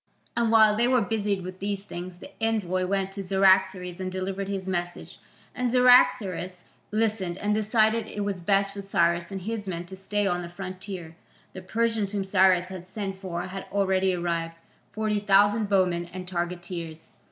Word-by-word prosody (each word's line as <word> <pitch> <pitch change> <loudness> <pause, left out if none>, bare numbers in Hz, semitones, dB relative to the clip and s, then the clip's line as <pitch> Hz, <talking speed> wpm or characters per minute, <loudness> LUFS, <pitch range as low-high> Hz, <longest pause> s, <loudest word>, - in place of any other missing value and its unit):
And 235 -1 +2
while 220 -2 +6
they 235 +3 +2
were 255 -1 +3
busied 205 -3 -1
with 185 +1 -8
these 200 0 -3
things 175 -2 -7
the - - -12
envoy 185 -5 0
went 195 0 -1
to 195 0 -6
Cyaxares 190 -1 +3
and 185 0 -3
delivered 190 +1 -3
his 195 -1 -4
message, 175 -1 -4 0.3
and 250 -1 -1
Cyaxares 215 -8 +4 0.3
listened 210 -5 -1
and 205 +1 0
decided 220 +1 +2
it 205 - -5
was 200 -2 -2
best 195 +2 +1
for 200 - -6
Cyrus 170 -2 +1
and 190 -2 -5
his 215 0 -4
men 175 -2 -4
to 190 - -10
stay 205 +2 -1
on 180 -2 0
the 170 - -7
frontier. 185 -2 -7 0.4
The 185 - -8
Persians 220 +1 -1
whom 200 -1 -1
Cyrus 185 -2 +3
had 185 -1 -8
sent 195 -1 -5
for 175 -2 -4
had 190 +1 -7
already 190 -2 +2
arrived, 170 -1 -2 0.4
forty 215 -1 -1
thousand 205 +1 +3
bowmen 180 -3 +2
and 185 0 -7
targeteers. 175 -2 -5
190 Hz, 175 wpm, -26 LUFS, 180-205 Hz, 0.4 s, while